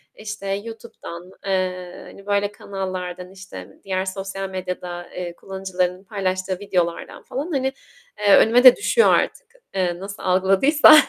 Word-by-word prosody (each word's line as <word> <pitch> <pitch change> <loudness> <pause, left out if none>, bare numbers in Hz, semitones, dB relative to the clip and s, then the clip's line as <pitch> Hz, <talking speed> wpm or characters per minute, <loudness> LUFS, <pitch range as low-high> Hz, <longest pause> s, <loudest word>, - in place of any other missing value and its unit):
işte, 210 -2 -7
YouTube'dan, 195 -4 -6
eee, 185 -2 -2
hani, 195 - -13
böyle, 205 0 +1
kanallardan, 185 -3 -5
işte, 190 0 -11
diğer 190 -1 -1
sosyal 195 0 -4
medyada, 180 -1 -5
eee, 175 -1 -6
kullanıcıların 185 -1 -3
paylaştığı 185 -2 -2
videolardan 175 -4 -2
falan, 290 +7 -4
hani, 265 -2 0 0.5
eee, 205 -1 +6
önüme 240 +3 +5
de 255 -2 +11
düşüyor 465 +3 +4
artık. - - 0 0.3
Eee, 175 -2 0
nasıl 200 +2 -8
algıladıysa. 195 +13 +6
190 Hz, 130 wpm, -22 LUFS, 185-205 Hz, 0.5 s, de